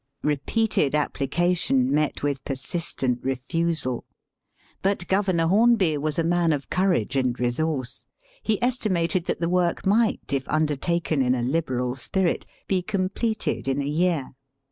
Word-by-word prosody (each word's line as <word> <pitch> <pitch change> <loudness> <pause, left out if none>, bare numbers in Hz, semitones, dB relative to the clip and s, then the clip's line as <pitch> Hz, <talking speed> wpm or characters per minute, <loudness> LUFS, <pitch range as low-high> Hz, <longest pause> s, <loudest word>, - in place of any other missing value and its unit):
Eepeated 150 +1 +1
application 145 -2 +1
met 150 -1 0
with 140 -2 -1
persistent 135 -2 -2
refusal. 135 0 -1 0.8
But 195 -2 0
Governor 190 -4 +2
Hornby 200 -3 +4
was 150 +1 -2
a 165 - +2
man 170 0 +2
of 140 -2 -5
courage 180 - +1
and 130 -2 0
resource. 130 +1 -2 0.3
He 215 -2 0
estimated 185 -8 0
that - - -2
the 170 - +1
work 180 +1 +1
might, 215 +3 +3
if 135 -1 -2
under 155 -1 +1
taken 165 -1 0
in 130 0 +2
a 120 - -2
liberal 125 -3 0
spirit, 180 +7 0 0.2
be 190 -2 +1
completed 195 - -2
in 135 +1 0
a 140 - -1
year. 160 -1 0
160 Hz, 140 wpm, -25 LUFS, 135-180 Hz, 0.8 s, Hornby